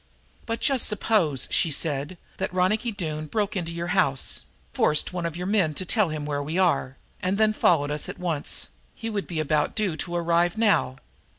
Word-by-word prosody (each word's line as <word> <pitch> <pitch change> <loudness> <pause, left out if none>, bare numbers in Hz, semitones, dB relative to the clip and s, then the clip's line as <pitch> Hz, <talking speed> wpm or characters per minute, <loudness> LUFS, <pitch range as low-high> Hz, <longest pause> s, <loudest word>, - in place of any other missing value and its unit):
"But 230 0 -3
just 270 -4 +3
suppose," 195 - +1
she 165 - +3
said, 145 +2 -2 0.2
"that 190 - -2
Ronicky 210 +6 +1
Doone 155 -6 -4
broke 210 +3 -1
into 170 -3 -2
your 170 +1 -4
house, 140 -9 +1 0.3
forced 150 +3 +2
one 175 -2 -1
of 165 0 -6
your 180 - -4
men 185 -7 +2
to 185 - -2
tell 210 -2 +2
him 155 -1 -4
where 145 -1 -2
we 155 +5 -3
are, 165 -8 +1 0.2
and 185 +2 0
then 215 0 +4
followed 145 -8 +2
us 150 0 0
at - - -6
once. 165 -5 -2 0.3
He 225 - -5
would 205 -2 -3
be 165 -3 -3
about 150 -1 0
due 205 -7 0
to 175 +1 -4
arrive 170 +3 +1
now. 210 - +2
175 Hz, 195 wpm, -25 LUFS, 155-205 Hz, 0.3 s, then